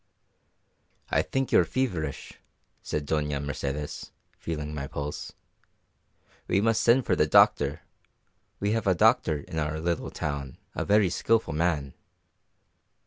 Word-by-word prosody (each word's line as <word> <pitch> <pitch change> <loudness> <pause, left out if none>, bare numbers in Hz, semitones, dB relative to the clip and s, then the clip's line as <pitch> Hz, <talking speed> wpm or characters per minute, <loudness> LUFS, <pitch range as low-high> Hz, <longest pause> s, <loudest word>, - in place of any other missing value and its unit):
"I - - +3
think 135 -1 -2
you - - +6
are - - +5
feverish," 90 - -3 0.5
said 75 -1 -3
Doña 75 -1 -1
Mercedes, 70 +1 -4 0.3
feeling 75 -2 -4
my 70 -2 -4
pulse. 70 0 -5 1.1
"We 95 - +2
must 115 +2 +2
send 120 +2 +4
for - - +2
the - - +2
doctor - - +4 0.8
we 100 +1 0
have 115 -2 -1
a 95 - +4
doctor 80 -2 +3
in 80 +1 -5
our 75 0 -2
little 85 0 -2
town, 70 -3 -4 0.2
a - - -2
very 100 -3 +3
skilful 115 -5 +1
man." 75 -4 0
80 Hz, 135 wpm, -27 LUFS, 75-100 Hz, 1.1 s, you